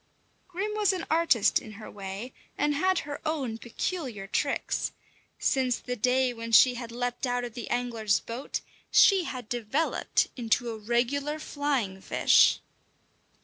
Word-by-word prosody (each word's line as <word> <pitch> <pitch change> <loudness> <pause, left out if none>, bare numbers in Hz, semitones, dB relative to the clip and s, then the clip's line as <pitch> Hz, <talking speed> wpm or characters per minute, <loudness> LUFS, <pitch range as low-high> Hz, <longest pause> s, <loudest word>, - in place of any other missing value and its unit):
Grim 385 +4 -3
was 415 -2 +2
an 365 -3 -4
artist 320 -10 +3
in 215 - -11
her 215 +1 -10
way, 200 +5 -7 0.2
and 295 0 +1
had 370 +5 +2
her 285 -1 -6
own 275 -8 -2
peculiar 240 - -4
tricks. 195 - -1 0.4
Since 255 -2 +1
the 250 - -5
day 250 +2 +2
when 230 0 -7
she 250 +3 +7
had 235 -1 -7
leapt 245 +2 -2
out 245 0 -1
of 240 -2 -6
the 240 -1 -7
angler's 230 -4 0
boat, 235 +4 -5 0.3
she 385 -4 +6
had 250 -7 -6
developed 245 +7 0
into 235 -1 0
a 225 - -6
regular 255 +7 0
flying 275 -11 -2
fish. - - +4
245 Hz, 145 wpm, -28 LUFS, 230-290 Hz, 0.4 s, she